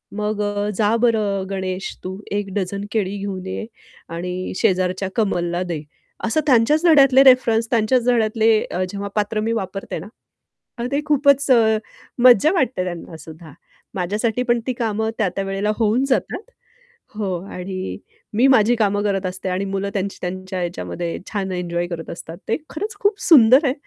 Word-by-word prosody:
"मग 210 Hz, 0 st, -2 dB
अ, 205 Hz, 0 st, -1 dB
जा 215 Hz, +1 st, +2 dB
बरं 210 Hz, -5 st, +1 dB
गणेश 190 Hz, -1 st, -4 dB
तू 185 Hz, +1 st, -5 dB
1 205 Hz, -2 st, -2 dB
डझन 200 Hz, +1 st, -2 dB
केळी 205 Hz, -2 st, -1 dB
घेऊन 195 Hz, -2 st, -5 dB
ये 200 Hz, -, -4 dB, 0.4 s
आणि 180 Hz, +2 st, -4 dB
शेजारच्या 185 Hz, +1 st, +1 dB
कमलला 175 Hz, -5 st, 0 dB
दे." 150 Hz, -, -4 dB, 0.4 s
असं 230 Hz, +7 st, +1 dB
त्यांच्याच 285 Hz, +7 st, +4 dB
धड्यातले 275 Hz, -4 st, +6 dB
रेफरन्स 235 Hz, -3 st, +4 dB
त्यांच्याच 235 Hz, +2 st, +2 dB
धड्यातले 225 Hz, -2 st, +3 dB
अ, 185 Hz, -, -1 dB
जेव्हा 200 Hz, +1 st, -5 dB
पात्र 210 Hz, +1 st, 0 dB
मी 225 Hz, +2 st, -1 dB
वापरते 195 Hz, -5 st, -4 dB
ना, 185 Hz, -, -9 dB, 0.7 s
अहो 240 Hz, -, -2 dB
ते 285 Hz, +2 st, +1 dB
खूपच 280 Hz, -2 st, +3 dB
अ, 220 Hz, -3 st, +5 dB, 0.5 s
मज्जा 255 Hz, -, +7 dB
वाटते 260 Hz, -, 0 dB
त्यांनासुद्धा. 160 Hz, -2 st, -8 dB, 0.4 s
माझ्यासाठी 215 Hz, +6 st, -1 dB
पण 240 Hz, -1 st, +1 dB
ती 255 Hz, -, 0 dB
कामं 220 Hz, -1 st, -1 dB
त्या-त्या 195 Hz, -1 st, -1 dB
वेळेला 195 Hz, +2 st, -1 dB
होऊन 230 Hz, +3 st, +2 dB
जातात. 310 Hz, +8 st, 0 dB, 0.7 s
हो. 195 Hz, -4 st, -2 dB, 0.2 s
आणि 185 Hz, +1 st, -5 dB, 0.4 s
मी 240 Hz, +5 st, +3 dB
माझी 240 Hz, -2 st, +5 dB
कामं 205 Hz, -2 st, +1 dB
करत 195 Hz, -2 st, -1 dB
असते 185 Hz, +1 st, -4 dB
आणि 185 Hz, +2 st, -1 dB
मुलं 195 Hz, 0 st, -2 dB
त्यांची 195 Hz, 0 st, -3 dB
त्यांच्या 185 Hz, +1 st, -4 dB
ह्याच्यामध्ये 175 Hz, -1 st, -4 dB
छान 195 Hz, -3 st, -2 dB
एन्जॉय 175 Hz, -1 st, -2 dB
करत 165 Hz, -2 st, -6 dB
असतात. 165 Hz, 0 st, -9 dB
ते -, -, +2 dB
खरंच 415 Hz, +8 st, -4 dB
खूप 405 Hz, 0 st, +1 dB
सुंदर 265 Hz, -1 st, +6 dB
आहे. 260 Hz, -, +2 dB
205 Hz, 160 wpm, -21 LUFS, 185-235 Hz, 0.7 s, मज्जा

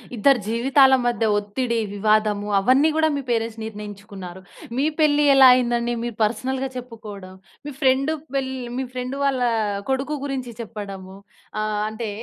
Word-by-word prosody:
ఇద్దరి 255 Hz, +4 st, +4 dB
జీవితాల 265 Hz, +4 st, +4 dB
మధ్య 240 Hz, -1 st, +1 dB
ఒత్తిడి, 230 Hz, +4 st, -2 dB, 0.2 s
వివాదము 210 Hz, 0 st, +1 dB
అవన్నీ 260 Hz, +9 st, +4 dB
గూడా 315 Hz, 0 st, +3 dB
మీ -, -, -2 dB
పేరెంట్స్ 225 Hz, -1 st, -1 dB
నిర్ణయించుకున్నారు. 200 Hz, -4 st, -9 dB, 0.4 s
మీ 275 Hz, -, +2 dB
పెళ్లి 295 Hz, -1 st, +4 dB
ఎలా 265 Hz, -1 st, +9 dB
అయిందండి? 240 Hz, -1 st, 0 dB
మీరు 240 Hz, -2 st, -4 dB
పర్సనల్‌‌గా 255 Hz, +5 st, -1 dB
చెప్పుకోడం, 215 Hz, -6 st, -9 dB, 0.3 s
మీ 295 Hz, -, -6 dB
ఫ్రెండ్ 270 Hz, +3 st, +3 dB, 0.2 s
పెళ్ళి 265 Hz, -1 st, -2 dB, 0.2 s
మీ 265 Hz, -, -2 dB
ఫ్రెండ్ 255 Hz, +1 st, -4 dB
వాళ్ళ 270 Hz, -2 st, +1 dB, 0.5 s
కొడుకు 270 Hz, +3 st, -1 dB
గురించి 260 Hz, -4 st, -4 dB
చెప్పడము, 200 Hz, -4 st, -8 dB, 0.5 s
ఆహ్, 215 Hz, -1 st, -1 dB
అంటే 220 Hz, 0 st, -5 dB
235 Hz, 135 wpm, -22 LUFS, 210-265 Hz, 0.5 s, ఎలా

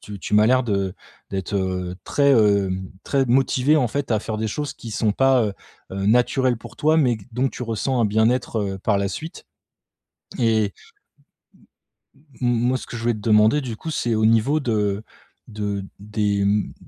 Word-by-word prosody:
tu 105 Hz, -1 st, -9 dB
tu 105 Hz, -, -3 dB
m'as 105 Hz, +1 st, +5 dB
l'air 130 Hz, +1 st, +3 dB
de 100 Hz, -4 st, -1 dB, 0.4 s
d'être, 95 Hz, 0 st, -4 dB
heu, 95 Hz, -2 st, -2 dB
très, 140 Hz, -1 st, +2 dB
hem, 100 Hz, -5 st, +2 dB
très 135 Hz, -1 st, +1 dB
motivée 135 Hz, +3 st, +3 dB
en 130 Hz, -5 st, +2 dB
fait 140 Hz, +2 st, -3 dB
à 110 Hz, -, +3 dB
faire 110 Hz, 0 st, -4 dB
des 110 Hz, 0 st, -1 dB
choses 145 Hz, +6 st, -4 dB
qui 115 Hz, -, -9 dB
sont 105 Hz, -1 st, 0 dB
pas, 135 Hz, +1 st, +3 dB
heu, 105 Hz, -, -2 dB, 0.4 s
heu, 95 Hz, +1 st, -2 dB
naturelles 125 Hz, +2 st, +2 dB
pour 120 Hz, +1 st, -12 dB
toi 155 Hz, +2 st, +2 dB
mais 125 Hz, -7 st, +2 dB
dont 125 Hz, +3 st, +1 dB
tu 125 Hz, -, -8 dB
ressens 120 Hz, +3 st, -1 dB
un -, -, +3 dB
bien-être, 110 Hz, +3 st, +1 dB
heu, 95 Hz, -1 st, -3 dB
par 100 Hz, +1 st, +1 dB
la 100 Hz, -, 0 dB
suite. 160 Hz, +10 st, -8 dB, 0.9 s
Et 110 Hz, -4 st, +2 dB, 1.7 s
m 125 Hz, -, +1 dB
moi 120 Hz, +2 st, +1 dB
ce -, -, -9 dB
que 120 Hz, -, -6 dB
je 115 Hz, -, -7 dB
voulais 120 Hz, 0 st, +2 dB
te -, -, -8 dB
demander 110 Hz, +6 st, +4 dB
du 120 Hz, -5 st, -6 dB
coup, 160 Hz, -, -6 dB
c'est 120 Hz, -6 st, -1 dB
au 110 Hz, -, +2 dB
niveau 115 Hz, +7 st, +3 dB
de 105 Hz, -5 st, -1 dB, 0.4 s
de 105 Hz, -2 st, -4 dB
des, 105 Hz, -1 st, -1 dB
mmh, 105 Hz, +1 st, 0 dB
110 Hz, 190 wpm, -22 LUFS, 105-125 Hz, 1.7 s, m'as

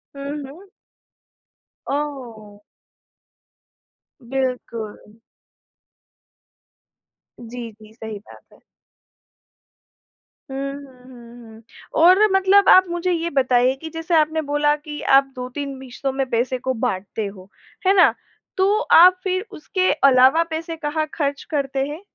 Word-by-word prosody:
हुँ, 280 Hz, 0 st, -6 dB
हुँ। 380 Hz, +5 st, -16 dB, 1.2 s
ओह! 245 Hz, -8 st, -5 dB, 1.7 s
बिल्कुल। 250 Hz, -5 st, -3 dB, 2.4 s
जी, 235 Hz, -1 st, -8 dB
जी, 215 Hz, 0 st, -18 dB
सही 220 Hz, -2 st, -8 dB
बात -, -, -16 dB
है। -, -, -22 dB, 1.9 s
हुँ, 275 Hz, +1 st, -4 dB
हुँ, 265 Hz, -3 st, -13 dB
हुँ, 235 Hz, -2 st, -14 dB
हुँ। 220 Hz, +1 st, -15 dB, 0.4 s
और 370 Hz, +5 st, +6 dB
मतलब 385 Hz, +1 st, +4 dB
आप 375 Hz, 0 st, +7 dB
मुझे 345 Hz, +1 st, -2 dB
ये 340 Hz, 0 st, -1 dB
बताइए 255 Hz, -2 st, +2 dB
कि 320 Hz, -, -6 dB
जैसे 325 Hz, +1 st, -2 dB
आपने 315 Hz, 0 st, +2 dB
बोला 295 Hz, 0 st, +1 dB
कि 295 Hz, 0 st, -9 dB, 0.2 s
आप 270 Hz, 0 st, +1 dB
2-3 265 Hz, +2 st, -6 dB
हिस्सों 265 Hz, +1 st, -5 dB
में 270 Hz, 0 st, -2 dB
पैसे 250 Hz, +2 st, -1 dB
को 260 Hz, +1 st, -3 dB
बाँटते 205 Hz, -1 st, -3 dB
हो, 195 Hz, -1 st, -10 dB, 0.4 s
है 390 Hz, -, +5 dB
ना? 365 Hz, -, +5 dB, 0.4 s
तो 400 Hz, +3 st, +2 dB
आप 365 Hz, +2 st, +7 dB
फिर 375 Hz, +2 st, -2 dB
उसके 370 Hz, +2 st, -1 dB
अलावा 265 Hz, +4 st, +5 dB
पैसे 325 Hz, +1 st, -5 dB
कहाँ 310 Hz, 0 st, -2 dB
खर्च 285 Hz, -3 st, -2 dB
करते 275 Hz, -2 st, -1 dB
हैं? 305 Hz, +5 st, -7 dB
275 Hz, 120 wpm, -21 LUFS, 250-325 Hz, 2.4 s, आप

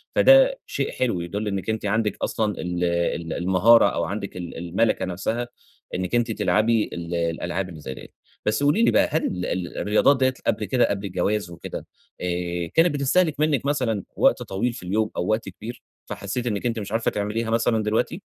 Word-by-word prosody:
فده -, -, +6 dB
شيء -, -, -2 dB
حلو، 115 Hz, -9 st, -1 dB
يدل 100 Hz, +5 st, -4 dB
إنّك 100 Hz, +1 st, -3 dB
أنتِ 110 Hz, -1 st, -2 dB
عندك 105 Hz, 0 st, 0 dB
أصلًا 105 Hz, -2 st, 0 dB
ال 90 Hz, 0 st, -2 dB
ال 85 Hz, -1 st, 0 dB
المهارة، 95 Hz, +6 st, +5 dB
أو -, -, -2 dB
عندك -, -, -4 dB
ال 85 Hz, -2 st, -6 dB
المَلَكَة 90 Hz, +6 st, 0 dB
نفسها، 110 Hz, +7 st, -2 dB, 0.5 s
إنّك 90 Hz, +5 st, -2 dB
أنتِ 120 Hz, -1 st, +1 dB
تلعبي 110 Hz, +1 st, +2 dB
ال 85 Hz, 0 st, -4 dB
الألعاب 85 Hz, +3 st, -2 dB
اللي 80 Hz, -3 st, -10 dB
زي 65 Hz, -3 st, -6 dB
دِيَّة، -, -, -11 dB, 0.4 s
بس 110 Hz, +7 st, +1 dB
قولي 175 Hz, +11 st, +3 dB
لي -, -, +5 dB
بقى، -, -, +4 dB
هل 160 Hz, +2 st, +1 dB
ال 90 Hz, 0 st, -2 dB
ال 90 Hz, -1 st, -3 dB
الرياضات 110 Hz, +7 st, +3 dB
دِيَّة 130 Hz, 0 st, +3 dB
قبل 105 Hz, -, +1 dB
كده، 120 Hz, +6 st, +2 dB
قبل 100 Hz, 0 st, -2 dB
الجواز 100 Hz, +1 st, -1 dB
وكده 85 Hz, -, -7 dB, 0.4 s
آآ، 90 Hz, -1 st, -2 dB
كانت 165 Hz, -1 st, +4 dB
بتستهلك 150 Hz, +2 st, +2 dB
منِّك 150 Hz, -4 st, +1 dB
مثلًا 125 Hz, -9 st, 0 dB
وقت -, -, +3 dB
طويل 120 Hz, +6 st, -2 dB
في 115 Hz, -, -9 dB
اليوم، 110 Hz, +4 st, 0 dB
أو 90 Hz, -, -1 dB
وقت 110 Hz, -2 st, 0 dB
كبير، 115 Hz, +6 st, -9 dB, 0.2 s
فحسّيتِ 120 Hz, +5 st, -4 dB
إنّك 105 Hz, +1 st, -2 dB
أنتِ 115 Hz, -2 st, 0 dB
مش 100 Hz, 0 st, -6 dB
عارفة 115 Hz, +1 st, +1 dB
تعمليها 105 Hz, +2 st, -2 dB
مثلًا 115 Hz, -1 st, +2 dB
دلوقتي؟ 105 Hz, +1 st, -1 dB
105 Hz, 190 wpm, -24 LUFS, 90-120 Hz, 0.5 s, فده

